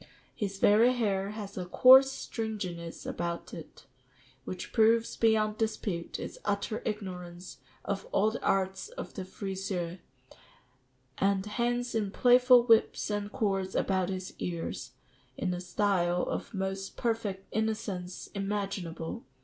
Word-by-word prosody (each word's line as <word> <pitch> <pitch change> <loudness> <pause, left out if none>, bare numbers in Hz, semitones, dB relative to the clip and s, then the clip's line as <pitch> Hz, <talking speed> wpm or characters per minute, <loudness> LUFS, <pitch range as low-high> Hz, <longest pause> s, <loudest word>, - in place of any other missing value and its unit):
His 200 -2 -3
very 220 +5 +5
hair 200 -5 0
has 205 -2 -6
a 180 - -3
coarse 260 +7 +8
stringiness 195 -10 -5
about 170 0 -4
it, 160 - -10 0.6
which 185 -1 -6
proves 225 0 +4
beyond 215 -1 +2
dispute 205 -6 -2
its - - -7
utter 205 +1 -1
ignorance 180 -4 -6 0.3
of 195 -1 -3
all 215 +2 +3
the 225 - -5
arts 190 - 0
of - - -8
the 190 - -5
friseur, 190 -2 -4 1.2
and 195 0 +2
hangs 240 +2 -1
in 215 -3 0
playful 250 +3 +6
whips 225 -2 +3
and 205 0 -2
cords 195 -6 -1
about 190 -2 +1
his 185 -1 -4
ears, 170 -2 -4 0.4
in 180 - -1
a 175 - -4
style 180 -2 +1
of - - -3
the 210 - -8
most 190 0 -3
perfect 220 -5 -2
innocence 205 -5 -2
imaginable. 195 -5 -3
200 Hz, 130 wpm, -30 LUFS, 185-220 Hz, 1.2 s, coarse